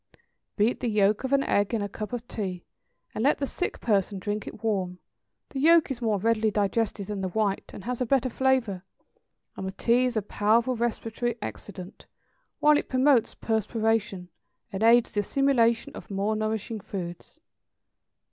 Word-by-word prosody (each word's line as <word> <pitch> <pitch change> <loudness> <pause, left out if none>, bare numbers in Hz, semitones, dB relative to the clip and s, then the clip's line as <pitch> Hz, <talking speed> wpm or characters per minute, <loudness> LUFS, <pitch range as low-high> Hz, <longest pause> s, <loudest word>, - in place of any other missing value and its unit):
= - - -54
Beat 220 +4 +2
the 245 - -1
yolk 210 0 +2
of 265 - -3
an 275 0 +3
egg 205 +3 +1
in 220 - -1
a - - -2
cup 210 +2 -6
of 245 -1 -5
tea, 185 -7 -5 0.5
and 220 - -2
let 285 - +4
the 280 - -1
sick 360 +6 -3
person 200 -2 +1
drink 205 +2 -3
it 215 - -9
warm; 190 -5 -1 0.5
the 270 - -5
yolk 325 +1 +5
is 250 -2 -4
more 220 -3 +1
readily 220 +2 +2
digested 205 0 0
than 205 0 -4
the 190 - -1
white, 200 +1 -1
and 195 - -9
has 250 +3 -3
a - - +2
better 265 0 +2
flavor; 250 -7 0 0.7
and 190 - -5
the - - -3
tea 240 +5 +2
is 245 -2 -1
a 215 - 0
powerful 225 +5 +2
respiratory 235 0 -2
excitant, 195 -2 -8 0.5
while 300 0 +5
it - - -7
promotes 260 -3 +3
perspiration, 220 -3 -1 0.4
and 190 - -3
aids 230 +1 +5
the 205 - -1
assimilation 235 0 +2
of - - -10
more 200 +2 -1
nourishing 215 0 -2
foods. 175 -3 -7
220 Hz, 175 wpm, -27 LUFS, 205-245 Hz, 0.7 s, yolk